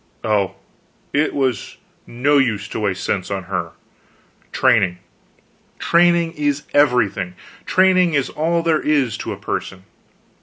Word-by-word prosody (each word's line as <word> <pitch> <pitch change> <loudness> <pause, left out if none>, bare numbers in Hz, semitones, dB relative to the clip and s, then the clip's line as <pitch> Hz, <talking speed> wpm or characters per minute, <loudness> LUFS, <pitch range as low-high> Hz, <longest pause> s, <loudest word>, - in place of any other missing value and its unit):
Oh, 105 -3 0 0.6
it 150 +2 +2
was 130 -5 -2 0.3
no 140 +5 +2
use 110 -5 0
to - - -4
waste 100 -3 -2
sense 95 -3 -2
on 95 -2 -3
her. 95 +1 -4 0.8
Training 105 -9 +2 0.8
training 170 -1 +3
is 145 -1 -1
everything; 110 -10 +2 0.3
training 185 -3 +3
is 140 -2 +1
all 170 +2 0
there 165 -2 +2
is 140 -7 +1
to - - -4
a - - -5
person. 95 -1 -5
130 Hz, 125 wpm, -19 LUFS, 100-155 Hz, 0.8 s, training